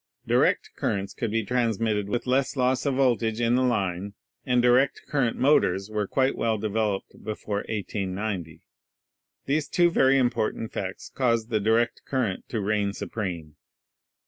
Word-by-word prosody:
Direct - - +2
currents 100 -1 -2
could 115 -4 -3
be 110 0 -1
transmitted 110 -3 0
with 120 +3 -2
less 130 +2 +1
loss 130 +1 +1
of 135 - +1
voltage 120 -4 +1
in 120 0 +2
the 125 - +3
line 100 -5 -1 0.3
and 125 -1 +2
direct 125 +3 +3
current 135 -6 0
motors 100 -8 +2
were 105 -2 -1
quite 135 +4 +1
well 115 -1 0
developed 105 -1 -2
before 105 -1 -4
1890. 95 -5 -4 0.8
These 145 +1 0
two 175 -1 +3
very 135 -4 +4
important 120 -3 0
facts 95 0 -5
caused 115 -3 0
the 110 - +2
direct 115 +3 +1
current 125 -9 -2
to 115 - -2
reign 100 0 0
supreme. 85 -9 -5
110 Hz, 145 wpm, -26 LUFS, 100-125 Hz, 0.8 s, very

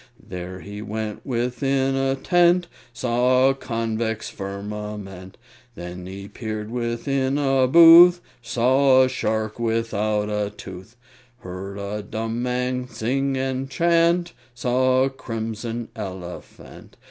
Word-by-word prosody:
There 90 0 -8
he 105 +1 -8
went 110 0 -5
within 130 +2 0
a 135 0 +1
tent, 175 +4 +3 0.3
Saw 125 +2 +2
a - - +2
convex 115 -3 -3
firmament; 100 -1 -7 0.4
Then 90 -1 -8
he 100 +1 -8
peered 110 -1 -6
within 130 +3 -1
a 135 -2 +2
booth, 170 +4 +9 0.2
Saw 130 +2 +4
a - - +3
shark 110 -3 -2
without 110 -2 0
a 105 -1 -1
tooth, 95 +1 -11 0.5
Heard 95 +2 -7
a 100 +1 -4
dumb 115 +3 -4
man 125 0 -2
sing 135 +4 -1
and 130 0 -2
chant, 170 +4 +2 0.2
Saw 130 +1 +2
a 135 - +1
crimson 115 -1 -5
elephant. 95 -4 -9
115 Hz, 115 wpm, -23 LUFS, 105-130 Hz, 0.5 s, booth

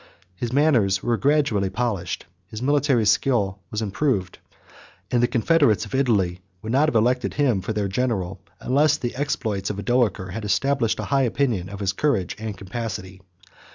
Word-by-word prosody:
His 115 +6 -4
manners 125 -9 +3
were 120 - +1
gradually 135 -8 +1
polished, 100 -5 -2 0.2
his 110 +1 -7
military 135 -3 +2
skill 105 -3 +2
was 110 +1 -3
improved, 105 -2 -1 0.7
and 120 - +2
the 120 - +4
confederates 120 -4 +2
of 105 - -12
Italy 100 -10 +1 0.2
would 110 - -4
not 145 +5 +3
have 125 - -5
elected 125 +3 +1
him 130 -10 +2
for 100 - -4
their 105 -2 -1
general, 95 -4 -2 0.2
unless 150 +4 +2
the 120 -5 -3
exploits 110 -8 -2
of 105 - -4
Odoacer 100 -4 0
had 110 +4 -5
established 115 +3 +1
a - - -2
high 135 - +4
opinion 120 -7 0
of 100 +1 -8
his 100 -1 0
courage 110 -7 0
and 110 -3 -5
capacity. 95 -2 -6
115 Hz, 165 wpm, -23 LUFS, 100-130 Hz, 0.7 s, the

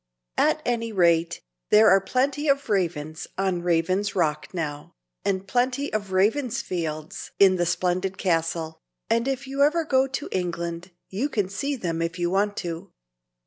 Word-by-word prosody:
At - - +2
any 230 -2 -1
rate, 170 -4 +2 0.3
there 215 +1 +7
are 195 - +6
plenty 275 +7 0
of 280 -4 +1
Ravens 160 -5 -1
on 190 -2 0
Raven's 180 +4 +1
Rock 155 -4 0
now, 150 -5 -5 0.3
and 195 0 -1
plenty 255 +5 0
of 205 -3 -2
Ravensfields 190 - -1
in 190 -2 +6
the 175 -1 +1
splendid 185 +2 0
castle; 165 -2 -1 0.3
and 230 +2 +2
if 270 0 -2
ever 285 +5 +2
you - - -6
go 265 -1 +3
to 270 +2 -4
England, 170 -1 -3 0.2
you 230 +10 -1
can 205 -8 -1
see 275 +9 -2
them 165 -8 -3
if 165 +1 -2
you 175 0 0
want 205 +2 +1
to. 165 -1 -6
190 Hz, 155 wpm, -25 LUFS, 170-245 Hz, 0.3 s, there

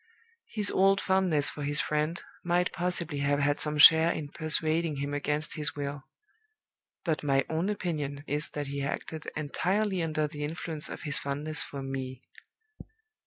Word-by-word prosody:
His 210 -2 +1
old 195 +1 +4
fondness 185 -7 +2
for 150 - -8
his 145 +1 +2
friend 155 +3 -1 0.2
might 175 +1 +1
possibly 175 -4 -1
have 140 0 +1
had 145 +1 +1
some 150 0 +4
share 160 +3 +8
in 150 -4 -5
persuading 155 +1 -1
him 140 +1 -4
against 150 +1 -1
his 150 -2 -1
will; 140 -1 -5 1.0
but 160 -5 -1
my 135 -2 +2
own 165 +5 0
opinion 150 -8 -3
is 150 +2 -1
that 145 -1 -2
he 140 0 -4
acted 155 +3 -4
entirely 185 +6 0
under 155 -2 0
the 145 0 -7
influence 155 0 -3
of - - -8
his 145 -3 +3
fondness 150 +3 0
for 140 -1 -5
Me. 130 -1 -5
150 Hz, 160 wpm, -29 LUFS, 145-165 Hz, 1.0 s, share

